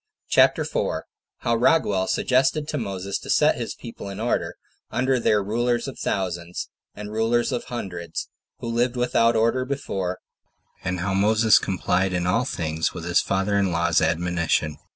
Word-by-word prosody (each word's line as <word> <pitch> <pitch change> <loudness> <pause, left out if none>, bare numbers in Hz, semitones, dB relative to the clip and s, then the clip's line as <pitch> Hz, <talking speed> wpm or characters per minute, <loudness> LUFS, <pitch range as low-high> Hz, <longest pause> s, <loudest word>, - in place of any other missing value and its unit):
CHAPTER - - +4
4. - - -2 0.4
How 120 - +1
Raguel 115 -7 +2
Suggested 135 +4 +2
To 150 - -2
Moses 100 -3 -3
To - - -11
Set - - +4
His - - -4
People 115 -4 -9
In 100 +1 -7
Order, 120 +2 -1 0.3
Under 130 0 +1
Their 105 -3 +2
Rulers 120 +4 0
Of 135 - -7
Thousands, 90 -2 -3 0.3
And 105 0 -7
Rulers 115 +2 +1
Of 120 - -2
Hundreds, 90 -8 -5 0.3
Who - - -4
Lived 120 +2 0
Without 120 -1 +2
Order 115 +3 +2
Before; 100 -9 -3 0.7
And 90 -1 -2
How 95 0 -1
Moses 110 +2 +4
Complied 95 0 0
In 90 -1 0
All 115 +8 +2
Things 80 -9 -2
With 85 - -6
His 85 0 +3
Father 95 +1 0
In 95 -2 +1
Law's 85 -1 +2
Admonition. 80 -2 0
100 Hz, 160 wpm, -24 LUFS, 90-120 Hz, 0.7 s, CHAPTER